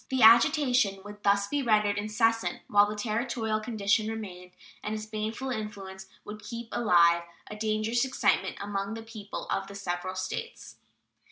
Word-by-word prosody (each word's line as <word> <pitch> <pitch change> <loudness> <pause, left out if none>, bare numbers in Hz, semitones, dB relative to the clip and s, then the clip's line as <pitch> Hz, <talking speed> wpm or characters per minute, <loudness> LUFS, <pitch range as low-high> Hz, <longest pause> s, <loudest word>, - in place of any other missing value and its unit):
The 260 -3 +1
agitation 235 -4 +5
would 205 0 -10
thus 200 0 +2
be 290 +4 -1
rendered 210 -4 +2
incessant 225 +2 0
whilst 205 0 +4
the 210 - -4
Territorial 220 -1 -1
condition 215 -1 0
remained, 185 -5 -7 0.3
and 210 +1 -2
its 215 0 -5
baneful 220 +4 -4
influence 195 -4 -6 0.2
would 210 0 -8
keep 235 0 -7
alive 170 -6 +4 0.3
a - - -5
dangerous 215 +2 0
excitement 265 - +1
among 200 +1 -3
the 225 - -7
people 220 -3 -7
of 195 - -1
the 200 - -10
several 185 -1 -4
States. 460 - -6
215 Hz, 155 wpm, -28 LUFS, 200-225 Hz, 0.3 s, agitation